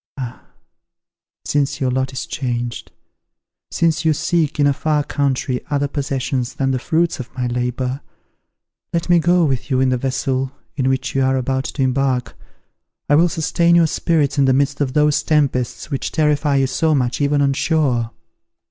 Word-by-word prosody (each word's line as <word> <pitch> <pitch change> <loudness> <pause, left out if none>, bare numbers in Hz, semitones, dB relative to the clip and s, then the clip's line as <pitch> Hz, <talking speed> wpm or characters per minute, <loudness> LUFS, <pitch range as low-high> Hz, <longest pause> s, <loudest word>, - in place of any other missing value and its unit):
Ah! 125 -2 -7 1.0
since 145 -1 0
your 130 -2 0
lot 130 +1 -1
is 130 - -5
changed, 120 -3 -4 0.8
since 165 -1 +1
you 160 -1 +3
seek 155 -1 0
in 145 - +4
a 140 - +4
far 150 +1 0
country 135 -3 -1
other 145 -1 0
possessions 135 -3 -2
than 135 -1 0
the 130 - 0
fruits 165 +5 0
of 125 -1 -7
my 125 - -1
labour, 125 +2 -2 0.9
let 170 +1 -1
me 175 -1 +6
go 175 +1 +3
with 135 -1 -2
you 130 -2 +1
in 130 0 +3
the 130 - +1
vessel 135 0 -1 0.2
in 130 -2 0
which 130 0 -1
you 135 - +1
are 130 0 +2
about 130 +1 -1
to 135 - -2
embark. 130 -1 0 0.7
I - - +4
will 170 +3 +4
sustain 170 +2 +2
your 170 -1 +5
spirits 155 -3 0
in 140 - +5
the 130 - +4
midst 140 +2 0
of 130 -3 0
those 150 -1 +3
tempests 140 -3 0
which 135 - -2
terrify 150 -2 +1
you 135 -1 +3
so 155 +4 +1
much 125 +1 0
even 145 0 +2
on 140 -1 +2
shore. 135 -6 +1
140 Hz, 175 wpm, -19 LUFS, 130-150 Hz, 1.0 s, me